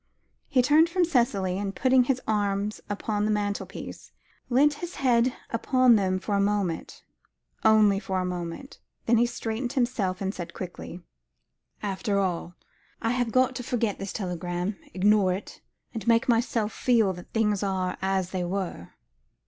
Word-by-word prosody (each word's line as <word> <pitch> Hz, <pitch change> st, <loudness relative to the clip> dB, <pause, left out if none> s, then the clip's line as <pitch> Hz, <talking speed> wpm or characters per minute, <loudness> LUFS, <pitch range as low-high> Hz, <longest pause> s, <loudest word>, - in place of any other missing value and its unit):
He 260 Hz, -5 st, +3 dB
turned 310 Hz, +6 st, +5 dB
from 355 Hz, 0 st, +2 dB
Cicely, 205 Hz, -, +1 dB
and, 200 Hz, -1 st, -3 dB
putting 260 Hz, -1 st, +4 dB
his 260 Hz, 0 st, +1 dB
arms 205 Hz, 0 st, -1 dB
upon 205 Hz, 0 st, -2 dB
the -, -, 0 dB
mantelpiece, 205 Hz, -1 st, -4 dB, 0.4 s
leant 280 Hz, +4 st, +4 dB
his 350 Hz, 0 st, -5 dB
head 245 Hz, -2 st, +2 dB, 0.2 s
upon 250 Hz, +1 st, +4 dB
them 190 Hz, -3 st, +1 dB
for 205 Hz, +2 st, -4 dB
a 200 Hz, -, +3 dB
moment 200 Hz, -5 st, -1 dB, 0.6 s
only 215 Hz, -3 st, +5 dB
for 190 Hz, -2 st, -2 dB
a 185 Hz, -, -1 dB
moment 180 Hz, +8 st, -6 dB, 0.3 s
then 235 Hz, 0 st, +4 dB
he 240 Hz, -, +4 dB
straightened 235 Hz, +1 st, -3 dB
himself, 230 Hz, -8 st, 0 dB
and 195 Hz, 0 st, -2 dB
said 175 Hz, -3 st, -7 dB
quietly 180 Hz, -1 st, -7 dB, 0.8 s
"After 200 Hz, +1 st, -1 dB
all, 175 Hz, -3 st, -1 dB, 0.4 s
I 225 Hz, -, 0 dB
have 245 Hz, -2 st, 0 dB
got 255 Hz, +1 st, +3 dB
to -, -, -4 dB
forget 235 Hz, -4 st, -1 dB
this 195 Hz, 0 st, -4 dB
telegram, 180 Hz, 0 st, -3 dB, 0.2 s
ignore 195 Hz, -1 st, +4 dB
it, 195 Hz, +3 st, -8 dB, 0.3 s
and 225 Hz, 0 st, -6 dB
make 230 Hz, 0 st, +4 dB
myself 230 Hz, -2 st, +1 dB
feel 225 Hz, -6 st, +2 dB
that 180 Hz, 0 st, -12 dB
things 210 Hz, -3 st, +1 dB
are 190 Hz, -2 st, -1 dB
'as 190 Hz, -1 st, 0 dB
they 185 Hz, -2 st, -2 dB
were.'" 175 Hz, -, -4 dB
210 Hz, 155 wpm, -26 LUFS, 190-240 Hz, 0.8 s, turned